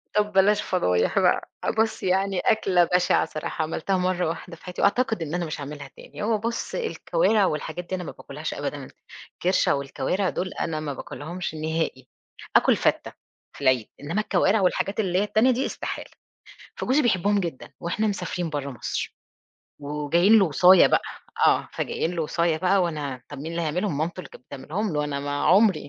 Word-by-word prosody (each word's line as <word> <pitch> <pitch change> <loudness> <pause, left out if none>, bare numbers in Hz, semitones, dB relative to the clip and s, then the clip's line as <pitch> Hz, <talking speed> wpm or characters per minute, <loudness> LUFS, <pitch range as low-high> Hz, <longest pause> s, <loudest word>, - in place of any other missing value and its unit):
طب 210 0 +2
بلاش 195 +2 +4
فضايح 90 - +1
بقى، - - +2 0.3
بُص 220 0 +1
يعني 190 0 +1
أكلة 190 -5 +3
بشِعة 180 +1 +2
صراحة 155 +1 -4
عملتها 165 +4 -1
مَرّة 180 -1 0
واحدة 170 +1 -6
في - - -22
حياتي، 180 -1 -5
وأعتقد 220 -2 +2
إن 160 -1 -4
أنا 175 - -1
مش 155 -1 -5
هاعملها 145 0 -7
تاني، - - -9
هو 220 0 +2
بُص 230 +2 -3
الكوارِع 455 - +1
والحاجات 175 +2 -3
دي 190 - -1
أنا 180 - -5
ما - - -6
باكلهاش - - -7
أبدًا، - - -5 0.5
الكِرشة 180 -3 +2
والكوارِع 140 +7 -1
دُول 185 - -3
أنا 155 -2 -2
ما 150 -2 -4
باكلهمش 165 +5 -6
نهائي، 155 -4 -2 0.5
آكُل - - +5
فتّة، - - 0 0.4
في - - -12
العيد، 130 -5 +2
إنما 165 +9 -1
الكوارِع 200 +1 +2
والحاجات 195 +2 0
اللي 185 -3 +1
هي - - +2
التانية 220 +4 +3
دي 255 +2 0
إستحالة، - - -5 0.6
فجوزي 270 +4 +1
بيحبهم 205 -3 +2
جدًا 170 -8 -5
وإحنا 215 +6 -1
مسافرين 180 -4 -3
برّه 145 -2 -3
مصر، 120 - -4 0.7
وجايين 150 +9 +3
له 195 - +5
وصاية 180 +3 +6
بقى، - - +2 0.4
آه - - +3
فجايين 165 - -2
له 165 - -1
وصاية 170 +1 +1
بقى 185 +3 +3
وأنا، 145 -7 -3
طب 145 - -8
مين 160 +4 -6
اللي 170 - -2
هيعملهم؟ 165 +1 -1
مامته 165 +4 -2
اللي - - -11
كانت - - -15
بتعملهم 170 +9 -4
له 150 0 0
أنا 140 -1 -3
ما 145 0 -3
عُمري 190 -6 +4
175 Hz, 180 wpm, -25 LUFS, 150-195 Hz, 0.7 s, وصاية